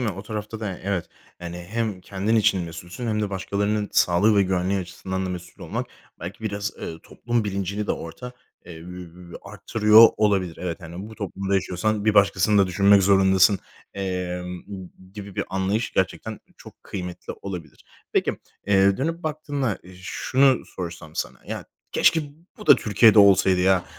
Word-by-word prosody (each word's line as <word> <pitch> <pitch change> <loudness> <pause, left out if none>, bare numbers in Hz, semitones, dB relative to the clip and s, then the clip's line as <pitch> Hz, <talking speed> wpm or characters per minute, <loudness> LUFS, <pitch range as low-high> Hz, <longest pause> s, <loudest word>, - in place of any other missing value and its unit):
mi? 120 - 0
O 95 0 -7
tarafta 105 +1 -6
da 105 -3 -3
y 90 - -8
evet. 95 -3 -2 0.3
Yani, 85 0 -7
hem 110 -4 -2
kendin 100 +4 -1
için 100 -4 +3
mesulsün 85 +7 -7
hem 110 -1 0
de 105 - -2
başkalarının 100 +2 -1
sağlığı 100 +5 +4
ve 100 - +5
güvenliği 95 +1 0
açısından 95 +1 -4
da - - -3
mesul 90 -1 -8
olmak - - -4 0.3
belki 90 +6 -8
biraz, 100 -1 -2
ııı, 80 - -7
toplum 120 -2 -2
bilincini 100 +1 -3
de - - +1
orada, 125 +10 -7 0.3
eee, 85 - -9
üüü, 90 +1 -10
arttırıyor 105 +2 +5
olabilir. 95 -5 +1
Evet, 90 0 -4
hani, 85 +4 -8
bu - - -10
toplumda 100 -1 -3
yaşıyorsan 100 +3 0
bir 110 -1 +3
başkasını 100 0 +4
da - - +1
düşünmek 100 +2 +5
zorundasın, 95 0 +5 0.4
emm, 90 -2 -4 0.5
gibi 100 -1 -9
bir - - 0
anlayış 95 +4 -1
gerçekten 105 +3 -2 0.2
çok - - -15
kıymetli 90 -2 -6
olabilir. 90 -5 -8 0.3
Peki, - - 0 0.3
eee, 100 -1 +4
dönüp 165 +5 -2
baktığında 145 -7 -2 0.2
şunu 130 +6 +2
sorsam 85 -3 -8
sana, - - -4
"Ya, - - -5 0.3
keşke 165 - +4 0.4
bu 210 - -10
da - - +9
Türkiye'de 110 0 +5
olsaydı 95 -2 +6
ya" 95 -1 +3
100 Hz, 160 wpm, -24 LUFS, 90-105 Hz, 0.5 s, da